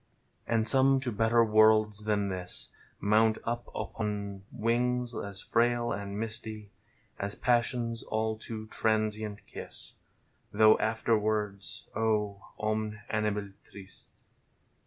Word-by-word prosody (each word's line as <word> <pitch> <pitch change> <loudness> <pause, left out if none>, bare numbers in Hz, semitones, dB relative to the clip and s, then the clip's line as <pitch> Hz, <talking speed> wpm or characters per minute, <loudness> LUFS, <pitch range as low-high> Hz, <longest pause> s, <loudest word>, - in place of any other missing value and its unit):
And 115 -1 +1
some 135 0 +6
to 125 -2 -2
better 115 +2 +3
worlds 110 -1 +4
than 105 -2 +1
this 90 -1 -4 0.3
Mount 110 +2 +3
up 120 +1 -3
on 100 -2 -4
wings 120 +2 0
as 100 -4 -4
frail 120 0 +1
and 100 0 -4
misty 110 -2 -3 0.5
As 100 +1 -2
passion's 120 -1 +1
all 110 0 -1
too 110 0 -7
transient 110 -2 -1
kiss - - -3 0.6
(Though 110 +1 +6
afterwards 110 -2 -1
— - - -27
oh, 105 -2 0 0.2
cm«/ 110 0 -2
animal 105 -2 -1
trist 95 -1 -14
110 Hz, 115 wpm, -30 LUFS, 105-115 Hz, 0.6 s, some